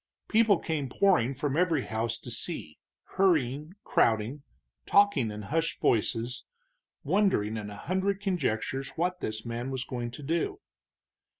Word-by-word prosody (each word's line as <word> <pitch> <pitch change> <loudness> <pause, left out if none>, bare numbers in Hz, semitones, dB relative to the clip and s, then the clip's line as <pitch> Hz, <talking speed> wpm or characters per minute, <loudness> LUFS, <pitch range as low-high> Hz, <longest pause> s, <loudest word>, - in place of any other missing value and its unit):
People 220 -3 +4
came 155 -5 -2
pouring 155 -6 +3
from 140 0 -1
every 165 -5 +2
house 115 +1 -2
to 120 - -9
see, 115 - -4 0.2
hurrying, 155 -4 +1
crowding, 115 +5 +2 0.5
talking 200 - +4
in 105 0 -6
hushed 160 +9 -1
voices, 115 +2 0 0.6
wondering 185 - +2
in 105 -2 -5
a 105 - -8
hundred 190 - -1
conjectures 135 - -1
what 180 +2 0
this 110 +1 -4
man 120 +2 -3
was 130 -1 -2
going 120 -3 -4
to 120 +5 -10
do. 170 - -1
135 Hz, 135 wpm, -29 LUFS, 115-180 Hz, 0.6 s, People